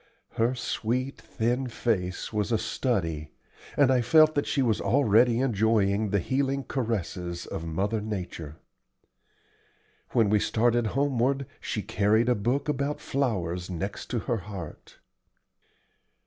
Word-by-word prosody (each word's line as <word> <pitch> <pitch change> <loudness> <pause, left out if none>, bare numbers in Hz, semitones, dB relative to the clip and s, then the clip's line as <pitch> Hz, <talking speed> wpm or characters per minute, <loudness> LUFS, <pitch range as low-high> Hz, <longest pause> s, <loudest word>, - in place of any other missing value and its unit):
Her 115 +3 +1
sweet, 125 +2 -2
thin 120 +3 -1
face 105 -6 -2
was 105 +2 -1
a 115 - +3
study, 90 - -1 0.5
and 140 -2 +5
I 125 -1 +3
felt 155 +6 +5
that 145 - 0
she 135 - +1
was 115 -4 +1
already 120 -2 +4
enjoying 110 -3 +2
the 100 - +2
healing 135 +7 0
caresses 90 -9 -3
of 80 - -5
Mother 100 +7 -1
Nature. 90 -7 -5 1.6
When 110 -4 +3
we 105 - +4
started 120 +2 +2
homeward 140 0 +1
she - - -3
carried 110 +4 +2
a - - +5
book 125 +7 -1
about 145 0 -1
flowers 90 -10 -2
next 95 +3 -4
to 120 - -1
her 120 - -1
heart. 95 -5 -9
115 Hz, 130 wpm, -27 LUFS, 100-130 Hz, 1.6 s, and